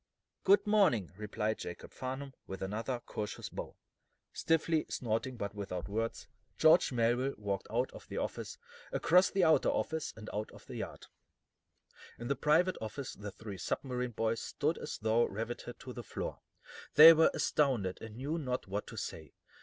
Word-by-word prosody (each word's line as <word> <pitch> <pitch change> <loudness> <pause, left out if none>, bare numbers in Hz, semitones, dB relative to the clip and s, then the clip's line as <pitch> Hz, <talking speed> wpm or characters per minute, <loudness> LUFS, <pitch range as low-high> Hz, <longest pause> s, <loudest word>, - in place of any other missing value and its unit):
"Good 200 +1 +5
morning," 190 - +3
replied 105 +1 -2
Jacob 85 - -7
Farnum, 130 +1 -5
with 95 0 -5
another 115 +6 -2
courteous 105 -1 -5
bow. - - -7 0.6
Stiffly, 165 -1 +1
snorting 120 +2 -2
but 100 -3 -3
without 95 -4 -4
words, 115 +3 -3 0.3
George 160 0 +6
Melville 125 +3 +1
walked 100 -2 -3
out 120 +4 0
of - - -12
the - - -6
office, - - -4 0.3
across 180 +3 +4
the 195 -2 +2
outer 160 -2 +5
office, 160 -1 -1
and 110 -1 -9
out 105 +1 -2
into - - -15
the - - -7
yard. - - -6 1.1
In 120 - -6
the 140 - +2
private 165 +7 +3
office 110 +5 -5
the 105 0 -7
three 100 -1 -8
submarine 125 +4 -2
boys 115 +1 0
stood - - -1
as - - -5
though 110 +2 +3
riveted 115 +3 -5
to 125 - -7
the 120 - -6
floor. - - -5 0.6
They 160 +2 +12
were 160 0 +5
astounded, 120 -11 +1
and 110 -1 -8
knew 145 +6 -2
not 125 -4 -2
what 100 +2 -4
to 115 - -9
say. 80 -6 -6
120 Hz, 165 wpm, -33 LUFS, 105-145 Hz, 1.1 s, They